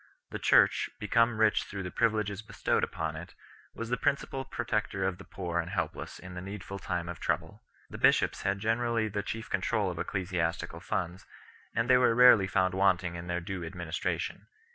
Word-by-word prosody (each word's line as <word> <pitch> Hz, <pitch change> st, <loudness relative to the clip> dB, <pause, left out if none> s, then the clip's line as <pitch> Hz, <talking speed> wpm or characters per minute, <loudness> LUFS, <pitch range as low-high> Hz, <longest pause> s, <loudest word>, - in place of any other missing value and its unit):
The -, -, -4 dB
Church, -, -, +4 dB
be 105 Hz, -, -4 dB
come 115 Hz, +1 st, +3 dB
rich 110 Hz, -1 st, +3 dB
through 100 Hz, -1 st, -6 dB
the 90 Hz, -, -5 dB
privileges 105 Hz, -2 st, 0 dB
bestowed 110 Hz, -, -1 dB
upon 80 Hz, -1 st, -2 dB
it, 85 Hz, +3 st, -9 dB, 0.4 s
was 115 Hz, 0 st, -5 dB
the 125 Hz, -, +2 dB
principal 135 Hz, -1 st, 0 dB
protector 110 Hz, -6 st, -2 dB
of 95 Hz, -1 st, -2 dB
the -, -, -9 dB
poor 85 Hz, -3 st, -3 dB
and 85 Hz, 0 st, -2 dB
helpless 85 Hz, -5 st, -3 dB
in 90 Hz, 0 st, -10 dB
the 90 Hz, -, -6 dB
needful 100 Hz, 0 st, -7 dB
time 90 Hz, -2 st, -3 dB
of 85 Hz, -2 st, -6 dB
trouble. -, -, -2 dB, 0.3 s
The -, -, -9 dB
bishops -, -, +3 dB
had 100 Hz, 0 st, 0 dB
generally 115 Hz, +1 st, 0 dB
the 100 Hz, 0 st, -2 dB
chief 110 Hz, +2 st, -5 dB
control -, -, 0 dB
of -, -, -7 dB
ecclesiastical 90 Hz, -3 st, -2 dB
funds, 90 Hz, +2 st, -3 dB, 0.5 s
and 115 Hz, +1 st, +1 dB
they 130 Hz, 0 st, +6 dB
were 125 Hz, -2 st, +4 dB
rarely 120 Hz, -5 st, +7 dB
found 95 Hz, -1 st, +1 dB
wanting 95 Hz, -2 st, +2 dB
in 85 Hz, 0 st, -7 dB
their 90 Hz, 0 st, -1 dB
due 95 Hz, 0 st, -5 dB
administration. 85 Hz, -1 st, -3 dB
95 Hz, 185 wpm, -30 LUFS, 90-110 Hz, 0.5 s, rarely